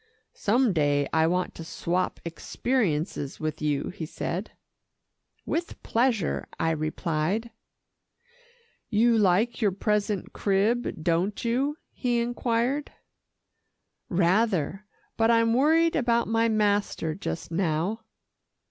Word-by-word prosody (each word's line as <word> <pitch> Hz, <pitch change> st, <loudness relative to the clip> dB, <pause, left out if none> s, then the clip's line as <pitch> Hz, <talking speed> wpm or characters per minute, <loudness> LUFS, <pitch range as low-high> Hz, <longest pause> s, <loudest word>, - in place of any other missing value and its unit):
"Some 235 Hz, +1 st, +2 dB
day 145 Hz, -3 st, +2 dB
I 160 Hz, 0 st, +4 dB
want 180 Hz, +2 st, 0 dB
to 165 Hz, -, -8 dB
swap 175 Hz, +2 st, -2 dB
experiences 170 Hz, -, -1 dB
with 155 Hz, -1 st, -3 dB
you," 145 Hz, -2 st, 0 dB
he 175 Hz, -4 st, -6 dB
said. 180 Hz, +6 st, -4 dB, 1.0 s
"With 340 Hz, +1 st, -3 dB
pleasure," 230 Hz, -6 st, 0 dB
I 165 Hz, -, +2 dB
replied. 160 Hz, +7 st, -1 dB, 1.4 s
"You 230 Hz, +2 st, +4 dB
like 215 Hz, +4 st, +2 dB
your 205 Hz, -3 st, +3 dB
present 205 Hz, 0 st, -1 dB
crib, 205 Hz, -2 st, 0 dB
don't 175 Hz, +7 st, 0 dB
you?" 270 Hz, +6 st, 0 dB
he 245 Hz, -2 st, 0 dB
inquired. 240 Hz, +4 st, -1 dB, 1.2 s
"Rather, 190 Hz, +1 st, +1 dB, 0.3 s
but 225 Hz, 0 st, +3 dB
I'm 230 Hz, -1 st, +4 dB
worried 320 Hz, +6 st, +4 dB
about 235 Hz, -3 st, +2 dB
my 225 Hz, +1 st, +2 dB
master 205 Hz, -6 st, +1 dB
just 170 Hz, -1 st, -5 dB
now." 175 Hz, +5 st, 0 dB
205 Hz, 105 wpm, -27 LUFS, 165-235 Hz, 1.4 s, I